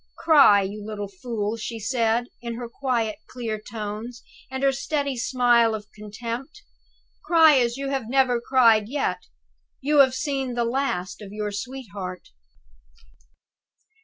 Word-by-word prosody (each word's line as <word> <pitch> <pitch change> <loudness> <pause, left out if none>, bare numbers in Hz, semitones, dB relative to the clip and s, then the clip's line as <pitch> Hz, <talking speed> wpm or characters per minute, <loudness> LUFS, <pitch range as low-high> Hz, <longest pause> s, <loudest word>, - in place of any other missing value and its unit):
"Cry, 275 -11 +6
you 205 +2 -6
little 205 -1 -5
fool!" 210 +2 -4
she 230 +1 -5
said, 230 +1 +1 0.2
with 235 -1 -5
her 240 0 -6
quiet, 235 -3 -2
clear 225 -4 -5
tones, 215 +2 -7 0.3
and 265 +1 -4
her 275 - +5
steady 280 0 -2
smile 240 -2 +3
of 210 -1 -9
contempt. 235 - -7 0.6
"Cry 320 -5 +6
as 240 0 0
you 275 0 -3
have 265 -5 -3
never 255 -2 +2
cried 230 -5 +4
yet! 285 +2 -1 0.6
You 295 +2 +2
have 260 -2 +6
seen 270 -3 -2
the 240 -1 0
last 230 -8 -2
of 200 -2 -9
your 210 0 -3
sweetheart." 205 -5 -7
235 Hz, 135 wpm, -24 LUFS, 215-265 Hz, 0.6 s, Cry